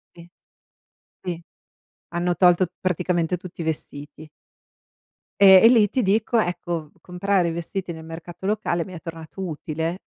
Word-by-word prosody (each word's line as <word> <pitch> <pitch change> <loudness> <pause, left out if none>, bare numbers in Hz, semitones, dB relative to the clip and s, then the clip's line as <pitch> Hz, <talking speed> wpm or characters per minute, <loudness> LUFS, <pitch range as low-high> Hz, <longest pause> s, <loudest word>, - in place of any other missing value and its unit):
Sì. 170 0 -14 0.9
Sì, 175 -2 -5 0.7
hanno 175 +1 -1
tolto 180 +1 +4
praticamente 180 -1 0
tutti 175 -1 -9
i - - -3
vestiti. 155 -1 -6 1.1
Ehm, 190 -2 +9
e - - +10
lì 225 -4 +5
ti 255 - 0
dico, 220 +4 +2
ecco, 175 -5 -2
comprare 180 0 0
i - - -2
vestiti 170 +2 -4
nel 160 -1 -10
mercato 170 +2 -10
locale 200 -5 0
mi 185 - -11
è 175 - -8
tornato 165 +2 -9
utile 160 +2 -4
175 Hz, 140 wpm, -23 LUFS, 165-190 Hz, 1.1 s, e